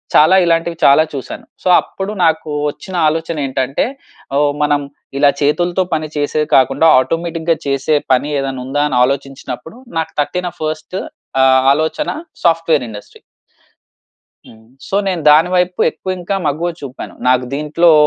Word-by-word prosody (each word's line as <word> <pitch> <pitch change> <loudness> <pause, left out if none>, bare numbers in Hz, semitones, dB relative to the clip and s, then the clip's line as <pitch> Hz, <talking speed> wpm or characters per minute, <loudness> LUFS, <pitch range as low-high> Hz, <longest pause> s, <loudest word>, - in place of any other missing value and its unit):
చాలా 155 +5 +6
ఇలాంటివి 165 0 0
చాలా 140 +3 +6
చూసాను. 135 -2 -7 0.2
సో - - -3
అప్పుడు 195 +1 -6
నాకు 160 -1 +1 0.2
వచ్చిన 185 +5 -9
ఆలోచన 160 +1 -2
ఏంటంటే 135 0 -1 0.5
ఓహ్! 145 0 +2
మనం 145 -1 +2 0.4
ఇలా 145 0 +5
చేతులతో 175 +5 +1
పని 155 0 -1
చేసేది 150 +1 0
కాకుండా 135 +4 +4
ఆటోమేటిక్‌గా 165 +3 -1
చేసే 140 +2 +1 0.2
పని 130 +3 +1
ఏదైనా 135 -1 -3
ఉందా? 145 +3 0
అని 125 - 0
ఆలోచించినప్పుడు 135 - -4 0.2
నాకు 160 0 -4
తట్టిన 180 +4 -2
ఫస్ట్ 155 +2 -4 0.5
ఆహ్, 130 - +5 0.2
ఆలోచన 160 - -1 0.4
సాఫ్ట్‌వే‌ర్ 165 -5 +2
ఇండస్ట్రీ. 105 -1 -11 1.3
హ్మ్. 110 0 -17 0.2
సో 195 - -1
నేను 180 -4 -1
దాని 155 +4 +5
వైపు 180 0 0
ఎక్కువ 190 - -7
ఇంకా 175 +3 -3
మగ్గువ 160 +5 -1
చూపాను. 135 -2 -8
నాకు 130 0 +3
దీంట్లో 150 +4 +3
155 Hz, 140 wpm, -16 LUFS, 140-165 Hz, 1.3 s, చాలా